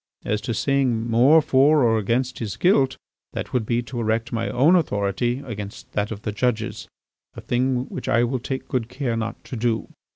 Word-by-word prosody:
As 105 0 -1
to 115 - -3
saying 125 -3 +1
more 130 +7 +5
for 145 +1 +4
or 115 -2 +3
against 120 +5 -1
his 105 -5 -4
guilt, 140 -8 +3 0.4
that - - -5
would 120 -4 0
be 120 0 0
to 120 +1 -6
erect 115 +1 -1
my 115 0 -1
own 150 +8 +4
authority 120 - 0
against 105 -5 -7
that 105 0 -1
of 110 -1 -7
the 105 - -2
judges, 110 0 -2 0.5
a - - -8
thing 125 +1 0
which - - -6
I 120 - +3
will 125 +2 -1
take 130 +2 -5
good 125 -5 -2
care 125 -2 -2
not 115 0 -4
to - - -7
do. 115 -1 -1
120 Hz, 195 wpm, -23 LUFS, 110-130 Hz, 0.5 s, more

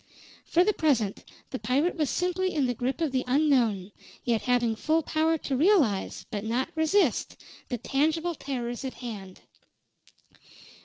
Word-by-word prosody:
For 345 - +3
the 425 +3 +2
present 245 - +1 0.3
the - - -4
pirate 260 +10 +1
was 305 -4 0
simply 360 +1 0
in 285 -3 +2
the 245 - 0
grip 255 +7 -3
of 315 -4 +1
the 255 -1 0
unknown, 250 -9 +2 0.3
yet 235 -3 +1
having 240 -3 +1
full 315 +7 +1
power 320 +1 +1
to 280 -3 -3
realize, 285 - +2
but 205 -3 -3
not 235 +4 -1
resist, 320 - +1 0.3
the 245 - -2
tangible 315 +8 0
terrors 245 -5 -4
at 265 - -5
hand. 205 -6 -8
270 Hz, 150 wpm, -27 LUFS, 235-320 Hz, 0.3 s, For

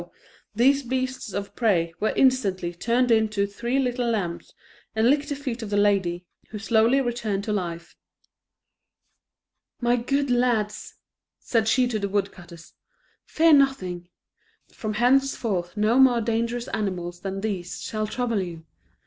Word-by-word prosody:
these 270 +5 +4
beasts 260 -2 -3
of 200 0 -5
prey 175 -8 +1
were 215 - +1
instantly 200 -10 +2
turned 240 +7 +1
into 215 -3 +2
three 235 +6 -3
little 245 -2 0
lambs, 185 -7 -3 0.4
and 220 +1 +3
licked 290 0 0
the 285 - -2
feet 260 -4 -5
of 220 - -6
the 205 - 0
lady, 190 -4 +1 0.2
who 215 - -6
slowly 225 +4 +3
returned 230 -6 -2
to 210 - -2
life. 170 -4 -4 1.8
"My 240 0 +2
good 275 +3 0
lads," 235 -4 0 0.4
said 225 -2 0
she 250 +2 +3
to 225 -3 -2
the 200 -1 -2
woodcutters, 175 -4 -5 0.5
"fear 325 0 +4
nothing. 185 -12 +1 0.6
From 215 -2 -4
henceforth 235 -7 +1
no 215 +4 +3
more 255 -3 +6
dangerous 235 +1 -1
animals 180 -5 -3
than 195 +1 -5
these 190 -5 -4
shall 215 -1 -3
trouble 230 -2 -1
you. 170 -3 -7
220 Hz, 140 wpm, -24 LUFS, 195-245 Hz, 1.8 s, more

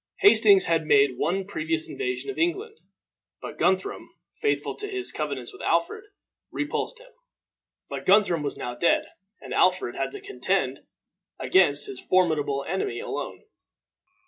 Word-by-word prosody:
Hastings 405 -1 +6
had 165 -2 +1
made 140 -4 +4
one 190 +5 0
previous 160 -4 -2
invasion 405 0 -3
of 395 - -8
England; 390 +7 -1 0.6
but - - -9
Guthrum, 190 0 0 0.3
faithful 435 - 0
to 415 - -4
his 385 -2 -3
covenants 140 -5 -4
with - - -12
Alfred, 170 - 0 0.4
repulsed 310 +10 -3
him. - - -17 0.8
But - - -7
Guthrum 190 -5 +4
was 145 -1 -4
now 120 - -4
dead, 145 +8 +2 0.4
and - - -7
Alfred - - +2
had - - -2
to 410 - -7
contend 400 0 -1 0.6
against 380 - +3
his 405 -1 -8
formidable 150 -6 +1
enemy 190 - -2
alone. - - -5
190 Hz, 140 wpm, -25 LUFS, -, 0.8 s, Hastings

